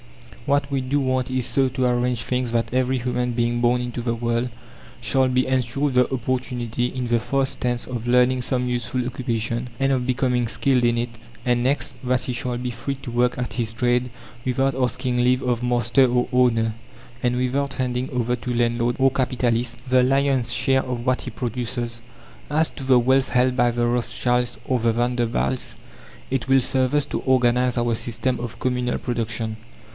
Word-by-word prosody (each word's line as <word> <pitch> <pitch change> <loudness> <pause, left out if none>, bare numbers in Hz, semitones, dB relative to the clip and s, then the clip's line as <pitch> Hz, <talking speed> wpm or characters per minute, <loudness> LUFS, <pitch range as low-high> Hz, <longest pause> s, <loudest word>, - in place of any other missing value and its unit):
What 140 0 +2
we 135 -2 0
do 130 +3 0
want 130 -2 0
is 130 -1 -1
so 135 -1 +2
to 130 0 -1
arrange 125 -1 +1
things 125 -2 -1
that 115 0 -1
every 130 +1 +1
human 125 0 -1
being 120 0 0
born 120 +1 +3
into 120 0 -4
the 115 -1 -1
world 120 +1 -1 0.5
shall 130 -1 +2
be 130 0 +2
ensured 130 +2 0
the 125 0 +3
opportunity, 125 -1 -2
in 125 0 -4
the 120 0 +2
first 135 +3 -1
instance 120 -1 0
of 120 -2 -5
learning 125 +1 +4
some 125 0 -1
useful 120 +1 -2
occupation, 120 -1 -2
and 135 0 +2
of 125 -2 0
becoming 125 -2 +1
skilled 125 +2 +1
in 120 0 +3
it; 120 +1 -1 0.4
and 120 0 +2
next, 135 +3 0
that 125 0 +1
he 125 - -3
shall 120 0 -2
be 125 0 -3
free 120 +4 -4
to 130 -2 -8
work 120 +1 +1
at 125 -1 -3
his 115 -2 -1
trade 125 +1 +1 0.3
without 135 +1 +1
asking 130 0 -1
leave 125 +1 +3
of 125 -1 0
master 125 +2 +3
or 125 0 +2
owner, 115 -3 +3 0.5
and 125 0 +1
without 135 +2 -1
handing 125 0 -1
over 125 -3 0
to 125 +1 -4
landlord 120 0 +1
or 135 0 +4
capitalist 125 -2 0
the 130 0 +4
lion's 135 -2 +2
share 135 0 +2
of 125 -2 -4
what 130 -1 +1
he - - -6
produces. 120 0 -4 0.5
As 155 +2 +2
to 135 - -8
the 130 -1 +5
wealth 130 +2 +2
held 125 +1 +2
by 120 -1 +3
the 120 0 0
Rothschilds 120 0 0
or 130 -1 +1
the 115 0 +2
Vanderbilts, 120 - -1 0.6
it 130 -2 -1
will 135 0 +6
serve 130 +1 +1
us 145 -1 +2
to - - -3
organize 125 -1 +2
our 120 0 +1
system 120 +3 -1
of 120 -2 -6
communal 125 -1 0
production. 115 -2 -2
125 Hz, 185 wpm, -23 LUFS, 120-130 Hz, 0.6 s, will